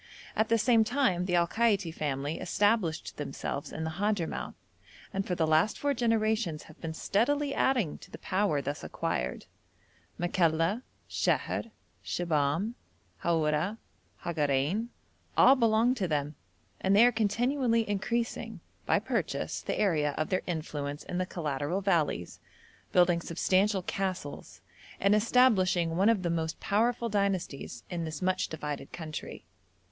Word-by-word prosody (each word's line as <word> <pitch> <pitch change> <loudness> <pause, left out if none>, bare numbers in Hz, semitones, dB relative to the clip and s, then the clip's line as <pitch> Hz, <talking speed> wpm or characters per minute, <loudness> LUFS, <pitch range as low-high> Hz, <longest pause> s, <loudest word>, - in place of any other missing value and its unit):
At 220 0 +1
the 230 - +4
same 225 0 +4
time 225 -7 +1
the 180 - +1
Al 170 -1 +4
Kaiti 205 -6 +1
family 145 0 -2
established 205 -5 0
themselves 145 -1 -4
in 160 - -4
the 160 - -2
Hadhramout, 205 -5 -1 0.6
and 195 0 -2
for 180 - 0
the 165 - +2
last 160 +6 +3
four 285 0 0
generations 220 - 0
have 155 - -16
been 160 -1 -4
steadily 280 - +1
adding 245 - +1
to - - -14
the - - -9
power 185 -7 0
thus 145 +2 -4
acquired. 60 0 -3 0.7
Makalla, 170 +3 +1 0.3
Sheher, - - 0 0.3
Shibahm, 165 +5 0 0.5
Haura, 165 +4 +1 0.5
Hagarein, 155 - 0 0.5
all 270 - +8
belong 230 0 +3
to 205 -8 -2
them, 150 -2 -1 0.5
and 190 +1 +2
they 220 +4 +8
are 245 - +5
continually 230 +2 +1
increasing, 230 +4 -2 0.3
by - - +4
purchase, - - -2
the - - -3
area 150 -8 +1
of 155 - -1
their 185 - +1
influence 150 -4 -4
in 180 - -4
the 185 - -1
collateral 150 +1 -2
valleys, 170 - 0 0.5
building 175 -1 +4
substantial 190 +4 +1
castles, 185 -6 -4 0.4
and 200 +1 +4
establishing 205 -7 +3
one 195 +5 +4
of 215 -5 +2
the 170 - 0
most 160 -1 -2
powerful 235 +3 +1
dynasties 195 - -2
in 170 -1 -2
this 155 -2 -5
much 185 0 +1
divided 150 -3 -5
country. 155 -3 -7
185 Hz, 140 wpm, -30 LUFS, 160-220 Hz, 0.7 s, all